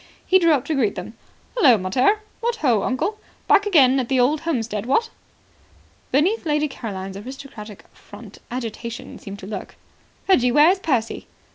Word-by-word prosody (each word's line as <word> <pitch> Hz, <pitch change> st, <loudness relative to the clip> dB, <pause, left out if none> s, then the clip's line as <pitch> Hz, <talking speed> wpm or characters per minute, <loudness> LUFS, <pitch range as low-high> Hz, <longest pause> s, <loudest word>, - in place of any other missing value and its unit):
He 375 Hz, -, +5 dB
drew 335 Hz, -3 st, +4 dB
up 270 Hz, -4 st, 0 dB
to 320 Hz, -, -2 dB
greet 245 Hz, -8 st, +1 dB
them. -, -, -7 dB, 0.4 s
"Hullo, 265 Hz, -, +6 dB
mater. 250 Hz, -, +1 dB, 0.2 s
What 475 Hz, 0 st, -1 dB
ho, 245 Hz, -, +2 dB
uncle! 395 Hz, -, -2 dB, 0.3 s
Back 415 Hz, -, +4 dB
again 270 Hz, -8 st, +5 dB
at 250 Hz, -, -3 dB
the 265 Hz, -1 st, +2 dB
old 285 Hz, +5 st, +2 dB
homestead, 230 Hz, -9 st, -2 dB
what?" 450 Hz, -, +1 dB, 1.0 s
Beneath 360 Hz, +12 st, +2 dB
Lady 300 Hz, -2 st, +1 dB
Caroline's 195 Hz, -7 st, -6 dB
aristocratic 230 Hz, -3 st, -10 dB
front -, -, -14 dB
agitation 235 Hz, -1 st, -6 dB
seemed 200 Hz, -1 st, -9 dB
to 190 Hz, -, -10 dB
lurk. 210 Hz, -, -7 dB, 0.5 s
"Reggie, 250 Hz, -11 st, +4 dB
where 300 Hz, +6 st, +6 dB
is 380 Hz, -, -1 dB
Percy?" 250 Hz, -11 st, -2 dB
260 Hz, 160 wpm, -22 LUFS, 225-325 Hz, 1.0 s, Hullo